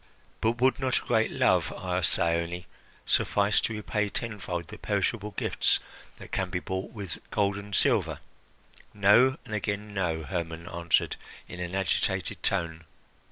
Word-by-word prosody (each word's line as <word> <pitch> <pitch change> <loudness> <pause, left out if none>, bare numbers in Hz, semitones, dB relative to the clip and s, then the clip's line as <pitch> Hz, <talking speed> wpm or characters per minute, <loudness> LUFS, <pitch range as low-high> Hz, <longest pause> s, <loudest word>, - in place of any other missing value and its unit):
"But 115 +2 +1
would 130 +1 +3
not 130 -2 +2
a - - -3
great 115 -2 +2
love," - - +2
asked 90 -2 +1
Thyone, 85 +1 0 0.4
"suffice 100 0 +3
to 110 - -1
repay 105 0 -1
tenfold 95 -6 -4
the - - -9
perishable 105 +1 0
gifts - - +2 0.4
that - - -12
can 95 -1 -1
be 90 - -1
bought 95 +1 -4
with 100 -6 -6
gold 100 -1 +1
and 100 -1 -5
silver?" - - +2 0.8
"No, 120 +7 +5
and 110 - -7
again 105 0 -2
no!" 85 -5 -1
Hermon 85 -1 -4
answered 85 -1 +1 0.3
in 90 - -8
an 90 +1 -3
agitated 95 -2 0
tone. 80 -4 -1
95 Hz, 150 wpm, -28 LUFS, 85-105 Hz, 0.8 s, No